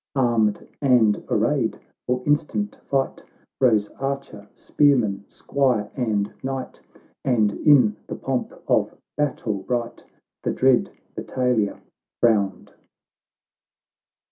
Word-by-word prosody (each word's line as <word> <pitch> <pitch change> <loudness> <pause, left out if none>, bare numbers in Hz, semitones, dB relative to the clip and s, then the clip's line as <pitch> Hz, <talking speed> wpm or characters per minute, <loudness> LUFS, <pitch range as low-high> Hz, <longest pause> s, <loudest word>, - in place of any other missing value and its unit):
Armed 115 -5 +1
and 120 -7 +3
arrayed - - +1 0.3
for 125 0 0
instant 150 +8 0
fight, 135 -1 -1 0.4
Rose 110 -6 +3
archer, 135 -7 -4
spearman, 115 -9 +2
squire, 125 -7 0
and 105 -5 -1
knight, 135 -1 -5 0.4
And 110 -5 +2
in 125 -8 +4
the - - -5
pomp - - -2 0.2
of - - +1 0.2
battle 125 -8 -1
bright 120 +2 -3 0.4
The - - -1
dread 130 -1 +3 0.3
battalia 125 -5 -1 0.4
frowned. 105 -4 +1
125 Hz, 95 wpm, -23 LUFS, 105-135 Hz, 0.4 s, in